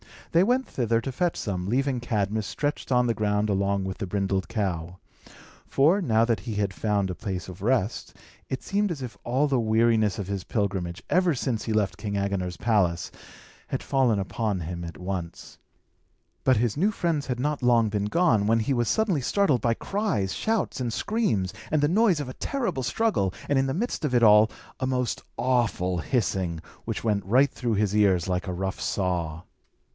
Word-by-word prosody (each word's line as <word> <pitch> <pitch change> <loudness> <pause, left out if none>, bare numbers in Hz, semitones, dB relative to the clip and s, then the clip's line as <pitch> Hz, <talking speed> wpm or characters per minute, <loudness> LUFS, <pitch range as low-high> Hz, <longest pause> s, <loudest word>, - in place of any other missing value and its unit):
They 170 +2 +5
went 250 +5 +2
thither 115 -2 0
to 135 - -4
fetch 175 +6 0
some, 90 -3 -3
leaving 130 +3 +1
Cadmus 110 -2 -1
stretched 145 +1 -3
on 125 -1 +4
the 120 - +2
ground 105 -1 0
along 100 0 +1
with 95 0 -4
the 100 - -3
brindled 95 0 -1
cow; 90 -5 -3 0.7
for, 160 +9 +3
now 115 -8 +3
that 115 -1 +1
he 115 -3 -5
had 100 -1 0
found 100 -2 0
a 90 - -3
place 95 -1 -4
of 95 0 -10
rest, 115 -1 0 0.3
it 130 - -4
seemed 205 -1 0
as 140 -5 -4
if 125 - -7
all 130 +5 +2
the 135 -3 +1
weariness 110 -3 +2
of 100 - -4
his 100 -2 -4
pilgrimage, 95 -5 -2
ever 180 -3 +3
since 120 -3 -2
he 110 - -1
left 105 -2 0
King 105 -2 -4
Agenor's 100 -3 -2
palace, 100 -6 +1 0.6
had - - -3
fallen 130 -6 +2
upon 100 0 -2
him 85 +1 -5
at 85 -2 -8
once. 90 -1 -6 0.9
But 130 -3 +5
his 115 +1 0
new 200 +7 +3
friends 165 -7 -1
had 125 -2 -2
not 145 +2 -1
long 120 -3 +4
been 100 -1 -1
gone, 110 - +2
when 115 +1 +3
he 135 +5 0
was 120 -2 +1
suddenly 200 -10 +1
startled 145 - +2
by 115 +1 +2
cries, 160 - -1
shouts, 220 -10 -1
and 120 -2 -1
screams, 115 - 0 0.2
and 155 -1 +2
the 145 - +3
noise 190 -4 +3
of 135 - -5
a - - -6
terrible 200 - -2
struggle, 125 - +1 0.2
and 140 -2 +3
in 135 - +1
the 135 - -1
midst 230 -1 -2
of 130 -4 0
it 120 - +4
all, 105 0 +7 0.3
a 130 - -1
most 125 -2 -1 0.2
awful 115 -7 +1
hissing, 90 - -1 0.2
which - - -3
went 105 -3 +1
right 130 +7 +4
through 120 -4 -1
his 105 -1 +1
ears 95 -5 +3
like 90 +1 -1
a 90 - -2
rough 95 +1 -3
saw. 85 -4 -2
110 Hz, 195 wpm, -26 LUFS, 100-135 Hz, 0.9 s, all